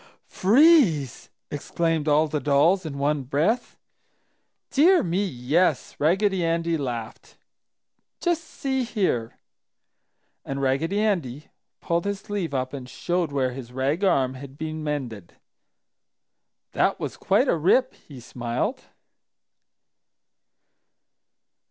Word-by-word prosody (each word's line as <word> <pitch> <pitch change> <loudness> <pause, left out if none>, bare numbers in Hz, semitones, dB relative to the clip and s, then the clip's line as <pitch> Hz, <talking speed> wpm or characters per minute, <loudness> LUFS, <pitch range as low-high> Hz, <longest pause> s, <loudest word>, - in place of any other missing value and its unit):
"Freeze!" 215 - +3 0.2
exclaimed 160 +1 -1
all 150 +1 +4
the 150 0 -2
dolls 155 +6 +2
in 140 -2 -6
one 145 +1 0
breath. 155 - -1 0.9
"Dear 345 +6 +5
me, 180 +3 0
yes!" 150 -1 0
Raggedy 190 +4 +2
Andy 165 0 0
laughed. 120 -6 -6 0.8
"Just 345 -2 0
see 265 -4 -3
here!" 185 - -1 1.1
And 135 0 -4
Raggedy 140 +9 0
Andy 155 - -2 0.3
pulled 170 +1 -1
his 200 -1 -2
sleeve 205 -7 -4
up 130 -1 -2
and 130 -3 -7
showed 175 +3 -2
where 130 -2 0
his 125 -1 -9
rag 135 +8 -1
arm 135 -9 +2
had 135 +1 -11
been 155 0 -5
mended. 125 - -5 1.4
"That - - +1
was - - -4
quite - - +2
a - - +3
rip!" 250 - +2
he 140 -4 -14
smiled. 120 0 -3
155 Hz, 110 wpm, -24 LUFS, 135-190 Hz, 1.4 s, Dear